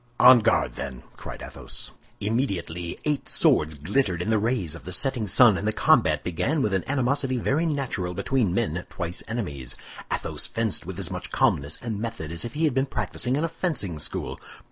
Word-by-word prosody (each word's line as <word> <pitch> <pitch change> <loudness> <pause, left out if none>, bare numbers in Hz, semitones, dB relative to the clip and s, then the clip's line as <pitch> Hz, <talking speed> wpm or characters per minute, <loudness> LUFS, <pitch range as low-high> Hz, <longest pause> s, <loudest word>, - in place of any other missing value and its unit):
"On 125 -1 +9
guard, 110 - +2
then!" 65 -3 -6
cried - - -8
Athos. - - -5 0.3
Immediately 95 -7 -2
eight 150 -2 0
swords 75 0 +3
glittered 90 - 0
in 110 - -1
the 110 - +3
rays 105 -7 0
of 85 - -9
the 90 - -7
setting 125 +2 0
sun, 110 -2 +6
and 105 - -3
the - - +3
combat - - +3
began 90 - 0
with 105 - 0
an 95 - +1
animosity 135 0 +1
very 145 +8 +1
natural 125 - -2
between 105 +1 +1
men 85 -1 0
twice 90 -1 -4
enemies. 70 - -4 0.4
Athos - - -2
fenced 110 -7 -1
with - - -6
as - - -4
much - - -4
calmness 70 +2 +1
and 110 -4 -3
method 105 -9 -4
as 85 0 -2
if 120 - -6
he 155 - 0
had 155 -4 +3
been 135 +2 +1
practicing 130 -1 -1
in 150 - 0
a - - +2
fencing 155 - -2
school. - - -3
110 Hz, 190 wpm, -26 LUFS, 85-130 Hz, 0.4 s, On